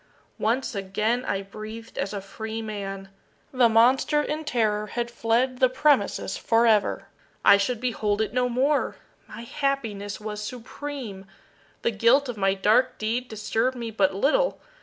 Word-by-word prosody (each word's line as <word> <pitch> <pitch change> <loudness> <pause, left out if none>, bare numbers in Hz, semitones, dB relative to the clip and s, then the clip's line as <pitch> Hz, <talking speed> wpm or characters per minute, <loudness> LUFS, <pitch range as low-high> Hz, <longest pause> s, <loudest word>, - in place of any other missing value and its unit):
Once 245 +4 0
again 210 +5 -1
I 195 0 -1
breathed 215 +3 -9
as 195 - -1
a 200 -2 -4
freeman. 205 -2 -6 0.4
The 255 -3 +4
monster, 250 +6 +4
in 305 +1 -3
terror, 215 -5 0
had 235 +2 -3
fled 240 +2 0
the 255 - +5
premises 280 +2 +1
forever! 225 -3 +2 0.4
I 200 - +8
should 215 +4 -1
behold 215 -4 -1
it 220 - -1
no 250 0 +1
more! 275 +4 +1 0.3
My - - -9
happiness 230 -7 -2
was 210 -1 -5
supreme! 240 -3 -7 0.6
The 235 - +2
guilt 235 +6 +3
of 245 - -4
my 195 -1 +1
dark 215 +6 +2
deed 235 +4 -2
disturbed 225 +3 -1
me 230 -2 -4
but 195 -3 +1
little. 405 - +2
225 Hz, 145 wpm, -25 LUFS, 210-255 Hz, 0.6 s, I